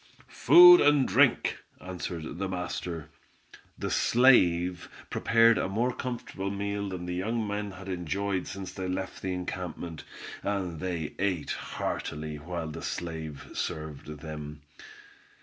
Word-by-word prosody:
"Food 355 +1 +9
and 145 -3 +4
drink!" - - +3 0.2
answered 85 -2 -6
the 95 -1 -2
master. 90 -3 -4 0.7
The - - -3
slave 90 -8 +4 0.2
prepared 115 -1 +4
a - - -1
more 120 +5 0
comfortable 120 -6 -4
meal 100 0 -3
than 90 -2 -5
the 90 - -3
young 110 +5 -1
men 105 0 -3
had 90 +1 -10
enjoyed 95 +2 -2
since 95 -1 -6
they 95 -1 -4
left 95 +1 -4
the 95 - -2
encampment, 90 -3 -5 0.4
and 95 -5 -2
they 85 -4 -3
ate 95 -5 -1
heartily 75 0 -4
while 85 +1 -5
the 80 +1 -7
slave 80 -4 -5
served 75 -3 -4
them. 75 -1 -7
90 Hz, 130 wpm, -28 LUFS, 80-100 Hz, 0.7 s, Food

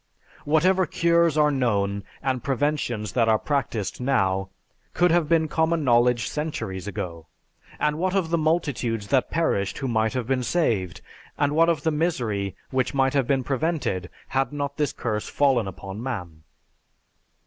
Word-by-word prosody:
Whatever 180 +4 +3
cures 170 -2 +2
are 150 -1 +4
known, 100 -7 0 0.2
and 130 -2 -1
preventions 135 -6 -1
that 115 -3 +2
are 110 - +5
practiced 125 -6 -2
now, 95 -7 +1 0.5
could 175 0 +4
have 165 -3 +2
been 165 -1 +3
common 160 +1 +1
knowledge 120 -3 +3
centuries 110 - -4
ago. 85 -4 -5 0.5
And 150 +1 0
what 185 +2 0
of 175 -4 0
the 170 - +3
multitudes 140 -10 -1
that 135 -2 +2
perished 100 - 0
who 135 - -3
might 110 -2 +1
have 125 -2 -2
been 130 +1 0
saved, 115 - 0 0.4
and 145 0 +1
what 165 +1 +5
of 155 -3 0
the 160 - +2
misery 120 - -1 0.2
which 130 0 0
might 135 -1 +2
have 135 -4 +1
been 135 -1 +1
prevented, 135 - -1 0.2
had 135 +1 0
not 140 -1 -3
this 150 -4 +1
curse 105 -3 -3
fallen 130 -7 +2
upon 95 +2 -7
man? 90 -11 -5
135 Hz, 160 wpm, -24 LUFS, 110-155 Hz, 0.5 s, are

